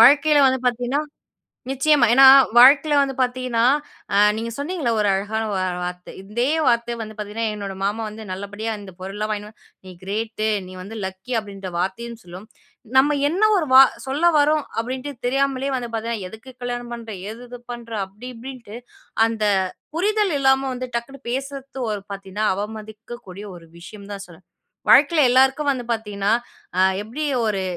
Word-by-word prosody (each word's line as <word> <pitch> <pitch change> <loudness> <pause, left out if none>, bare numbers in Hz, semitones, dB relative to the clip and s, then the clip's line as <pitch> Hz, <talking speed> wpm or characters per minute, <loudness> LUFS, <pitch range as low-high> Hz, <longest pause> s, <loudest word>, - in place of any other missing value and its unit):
வாழ்க்கையில 285 +4 +6
வந்து 260 0 +2
பாத்தீங்கன்னா 245 +3 0 0.7
நிச்சயமா. 270 -1 +3
ஏன்னா 270 +2 +8 0.3
வாழ்க்கையில 280 +4 +7
வந்து 275 -1 0
பாத்தீங்கன்னா 250 -2 0 0.5
அ - - +3 0.2
நீங்க 230 +1 -4
சொன்னீங்கல்ல 290 -3 -2
ஒரு 210 - +2
அழகான 205 +3 -1
ஒரு 185 -2 -1
வார்த்தை. 180 0 -7
இதே 235 +7 -1 0.2
வார்த்தை 235 0 +2
வந்து 215 0 -8 0.4
என்னோட 200 -2 -6
மாமா 210 +3 -1
வந்து 215 +1 -9
நல்லபடியா 205 +4 -5
இந்தப் 190 -2 -12
பொருள் 190 +1 -6
எல்லாம் 215 +1 -3
வாங்கினூ 210 0 -5 0.4
நீ 185 - -9
க்ரேட். 215 +3 -3 0.2
நீ 185 - -11
வந்து 210 +4 -9
லக்கி 190 +6 -7
அப்டின்ற 195 -3 -8
வார்த்தையும் 230 +6 -4
சொல்லும். 180 +4 -11 0.5
நம்ம 285 +2 +5
என்ன 365 +7 -2 0.6
சொல்ல 285 +6 -1
வர்றோம் 300 +1 +3 0.2
அப்டின்னு 260 +4 -5
தெரியாமலே 275 +1 0
வந்து 240 -2 -5
பாத்தீங்கன்னா 225 -3 -3
எதுக்கு 220 +6 -12
கல்யாணம் 245 0 -4
பண்ற, 230 -1 -9 0.2
எது 245 +2 -10
பண்ற 235 -1 -9 0.2
அப்டி 210 +6 -11
இப்டின்னுட்டு 235 -2 -9 0.5
அந்தப் 205 -4 0 0.2
புரிதல் 410 0 +1
இல்லாம 265 -1 +2 0.2
டக்குன்னு 270 +3 -6
பேசுறது 270 -1 -4 0.3
பாத்தீங்கன்னா 195 +2 -3
அவமதிக்கக்கூடிய 215 0 -8
ஒரு 165 -1 -15
விஷயம் 200 +3 -11
தான்னு 200 0 -7
சொல்வேன். 170 +2 -17 0.4
வாழ்க்கையில 295 -1 +6
எல்லாருக்கும் 265 +3 +3
வந்து 245 -3 -5
பாத்தீங்கன்னா 205 -2 -2 0.5
அ - - +4 0.2
எப்டி 290 +8 -4 0.2
ஒரு 195 -2 -1
235 Hz, 145 wpm, -22 LUFS, 205-265 Hz, 0.7 s, ஏன்னா